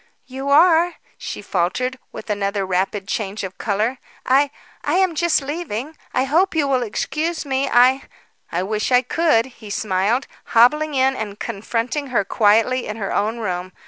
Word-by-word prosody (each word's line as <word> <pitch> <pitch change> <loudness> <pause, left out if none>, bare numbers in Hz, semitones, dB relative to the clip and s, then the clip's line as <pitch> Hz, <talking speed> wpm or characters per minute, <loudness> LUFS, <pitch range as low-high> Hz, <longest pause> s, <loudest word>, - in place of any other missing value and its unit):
"You 265 +2 -5
are," 335 +3 +5 0.2
she - - -7
faltered, 230 +8 -1
with - - -7
another 200 -1 -1
rapid 190 +2 -1
change 200 0 -3
of 190 -1 -7
colour. 220 +5 -1 0.3
"I 275 +2 +4 0.3
I 295 - 0
am 375 -2 +3
just 325 -2 +1
leaving. 295 -2 -4 0.2
I 255 - +1
hope 330 +8 +2
you 300 -3 +2
will 260 -2 +1
excuse 315 +8 -2
me. 270 0 0
I 255 +3 +4 0.2
" - - -43
"I 175 +2 -1
wish 210 +4 -2
I 250 0 +5
could," 280 -4 +2
he 240 -5 -13
smiled, 205 +5 0 0.3
hobbling 300 +6 +4
in 265 0 +3
and 210 -4 -5
confronting 235 +7 -3
her 240 -6 0
quietly 225 +5 +2
in 215 - -5
her 200 -3 -3
own 215 +3 0
room. 185 -4 -4
250 Hz, 170 wpm, -21 LUFS, 205-285 Hz, 0.3 s, are